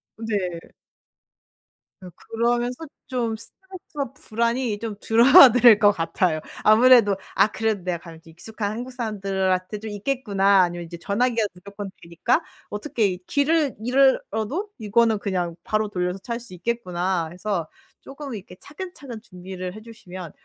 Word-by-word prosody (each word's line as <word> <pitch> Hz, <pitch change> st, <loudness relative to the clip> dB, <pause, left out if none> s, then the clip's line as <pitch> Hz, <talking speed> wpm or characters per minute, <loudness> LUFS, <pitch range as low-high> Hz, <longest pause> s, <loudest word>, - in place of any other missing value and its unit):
네. 200 Hz, -6 st, -3 dB, 1.4 s
네. 185 Hz, -, -9 dB
그러면서 240 Hz, +5 st, -2 dB, 0.2 s
좀 240 Hz, -4 st, -2 dB
스트레스와 300 Hz, -, -9 dB
불안이 235 Hz, -4 st, -1 dB
좀 220 Hz, -1 st, -5 dB
줄어들 240 Hz, -1 st, +7 dB
것 205 Hz, -2 st, +6 dB
같아요. 165 Hz, -2 st, -1 dB, 0.2 s
아무래도 225 Hz, -2 st, +6 dB, 0.2 s
'아 -, -, +5 dB
그래도 215 Hz, -3 st, -2 dB
내가 180 Hz, -2 st, -2 dB
가면 165 Hz, -1 st, -13 dB
좀 165 Hz, -, -16 dB
익숙한 205 Hz, +4 st, -5 dB
한국 245 Hz, +4 st, -6 dB
사람들한테 195 Hz, -4 st, -2 dB
좀 220 Hz, +1 st, -7 dB
있겠구나.' 200 Hz, -3 st, +2 dB
아니면 175 Hz, -1 st, -1 dB
이제 170 Hz, +1 st, -9 dB
전화기가 230 Hz, +2 st, +1 dB
무조건 200 Hz, +2 st, -9 dB
되니까 235 Hz, -, 0 dB, 0.3 s
'어떻게 210 Hz, 0 st, -1 dB
이 185 Hz, -2 st, -3 dB
길을 295 Hz, 0 st, +1 dB
잃어도 265 Hz, -, +1 dB
이거는 225 Hz, 0 st, +2 dB
그냥 180 Hz, -4 st, -2 dB
바로 215 Hz, 0 st, 0 dB
돌려서 180 Hz, -1 st, -2 dB
찾을 235 Hz, +4 st, -5 dB
수 235 Hz, -5 st, -13 dB
있겠구나.' 180 Hz, -4 st, -2 dB
해서 180 Hz, -2 st, -3 dB, 0.3 s
쪼끔 275 Hz, -3 st, -8 dB
이렇게 185 Hz, -2 st, -10 dB
차근차근 290 Hz, -, -9 dB
준비를 185 Hz, -3 st, -8 dB
해 215 Hz, -, -10 dB
주시면, 185 Hz, -7 st, -10 dB
215 Hz, 325 characters per minute, -23 LUFS, 185-240 Hz, 1.4 s, 줄어들